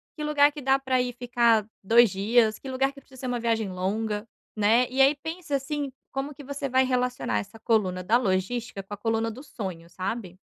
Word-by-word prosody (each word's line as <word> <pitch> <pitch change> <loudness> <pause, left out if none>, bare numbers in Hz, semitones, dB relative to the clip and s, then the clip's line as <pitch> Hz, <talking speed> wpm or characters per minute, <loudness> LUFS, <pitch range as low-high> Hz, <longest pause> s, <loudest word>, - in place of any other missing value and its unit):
Que 300 - -5
lugar 295 -1 +4
que 295 - -8
dá 270 0 +3
pra 260 -2 +1
ir 250 -1 -2
ficar 235 -3 +2 0.2
2 230 +2 +6
dias? 215 +3 +2
Que 270 - -8
lugar 270 +1 +1
que 275 - -14
precisa 260 -2 -17
ser 255 - -3
uma 245 -1 -1
viagem 225 -3 0
longa, 210 +4 -2 0.3
né? 225 +4 +4
E 265 +2 +1
aí 275 +2 +6
pensa, 320 0 -4
assim, 280 0 -2 0.2
como 270 +2 -3
que 290 - -11
você 280 0 -4
vai 260 +1 +4
relacionar 250 - 0
essa 105 - -8
coluna 190 -5 +1
da 225 +6 +4
logística 200 0 -1
com 195 - -9
a - - -5
coluna 225 +1 0
do 255 +5 -10
sonho, 185 - -7
sabe. 185 +1 -5
240 Hz, 210 wpm, -26 LUFS, 210-270 Hz, 0.3 s, 2